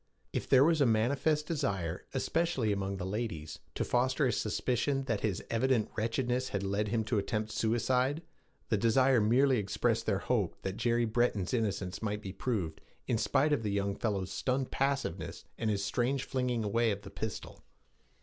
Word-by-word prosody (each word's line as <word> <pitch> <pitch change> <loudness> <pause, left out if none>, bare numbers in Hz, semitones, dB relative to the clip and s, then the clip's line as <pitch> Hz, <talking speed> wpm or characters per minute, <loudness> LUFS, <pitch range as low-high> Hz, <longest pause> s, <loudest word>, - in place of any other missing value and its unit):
If - - -3
there 130 0 +7
was 160 0 +3
a 140 - +5
manifest 140 +7 +2
desire, 95 - -2
especially 135 -5 +1
among 100 -1 -2
the 95 - -4
ladies, 85 -7 -4 0.2
to - - -1
foster 130 +4 +2
a 125 - +2
suspicion 125 +5 0
that 115 -6 -1
his 105 -5 -1
evident 115 -1 +1
wretchedness 120 +3 0
had 100 -1 -2
led 100 +2 0
him 110 +1 0
to 110 -1 0
attempt 105 +2 -2
suicide, 125 +7 +1 0.5
the 110 - +2
desire 120 +3 +4
merely 125 +4 +4
expressed 110 +3 0
their 100 -3 +2
hope 105 -3 0
that 95 0 -3
Jerry 120 0 +2
Breton's 110 -4 0
innocence 100 -5 -1
might 105 -1 -2
be 95 - -5
proved, 95 -12 -2 0.2
in 115 - 0
spite 145 +5 +2
of 145 - +1
the 105 - -2
young 100 0 0
fellow's 100 -4 -2
stunned 130 0 -1
passiveness 135 -9 -2
and 115 - -1
his 100 -2 0
strange 125 +5 0
flinging 125 -4 -1
away 115 +3 +2
of 100 -1 -3
the 100 - -10
pistol. 110 -2 -6
115 Hz, 175 wpm, -31 LUFS, 100-130 Hz, 0.5 s, there